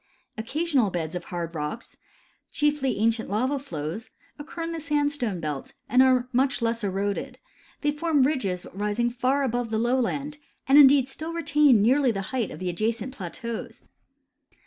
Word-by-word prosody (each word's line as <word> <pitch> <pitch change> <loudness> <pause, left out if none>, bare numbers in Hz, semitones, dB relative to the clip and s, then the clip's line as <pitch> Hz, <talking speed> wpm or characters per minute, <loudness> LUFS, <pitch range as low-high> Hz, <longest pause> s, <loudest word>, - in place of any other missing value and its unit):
Occasional 265 +1 0
beds 165 -3 -3
of 175 -1 -5
hard 170 -1 -5
rocks, 155 +9 -5 0.6
chiefly 295 -3 0
ancient 225 +1 +1
lava 255 +8 0
flows, 170 - -6 0.3
occur 325 +3 -6
in 330 - -3
the 330 -1 -5
sandstone 290 - -1
belt, 150 -4 -5
and 250 +3 +4
are 255 -1 +4
much 265 +2 +2
less 230 -1 -1
eroded; 200 +1 -2 0.4
they 295 - +2
form 300 -2 +1
ridges 210 -11 -1
rising 210 +4 -1
far 260 +3 +1
above 245 -2 -1
the 220 - -1
lowland, 260 +5 -1 0.3
and 275 +2 +7
indeed 275 -2 +7
still 315 +4 -6
retain 290 -8 +4
nearly 260 +3 +4
the 200 -4 -1
height 240 -5 0
of - - -8
the 185 - -5
adjacent 225 +6 -2
plateaus. 225 +3 -6
245 Hz, 155 wpm, -26 LUFS, 205-285 Hz, 0.6 s, and